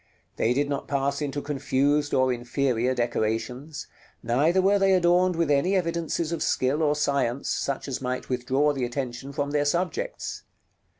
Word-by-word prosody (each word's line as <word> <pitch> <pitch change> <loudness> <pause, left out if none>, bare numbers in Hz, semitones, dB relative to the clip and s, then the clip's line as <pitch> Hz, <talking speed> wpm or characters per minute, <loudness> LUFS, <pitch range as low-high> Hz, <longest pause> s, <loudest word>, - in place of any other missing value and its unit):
They 120 +2 +1
did 145 +1 +1
not 140 -1 -3
pass 140 +1 -1
into 145 -1 -3
confused 145 +1 0
or 130 -1 +3
inferior 125 0 0
decorations; 120 +4 -2 0.4
neither 150 +10 +2
were 200 +2 +3
they 195 0 +4
adorned 180 0 +3
with 165 -3 +1
any 160 +8 +2
evidences 170 -2 -1
of 170 - -3
skill 135 +4 +1
or 150 -1 +2
science, 140 -3 0
such 140 0 -2
as 135 -2 -4
might 125 0 -3
withdraw 130 +4 +1
the 135 -3 -3
attention 125 +1 -4
from 145 0 -2
their 145 0 +2
subjects. 185 - -2
140 Hz, 160 wpm, -26 LUFS, 130-160 Hz, 0.4 s, they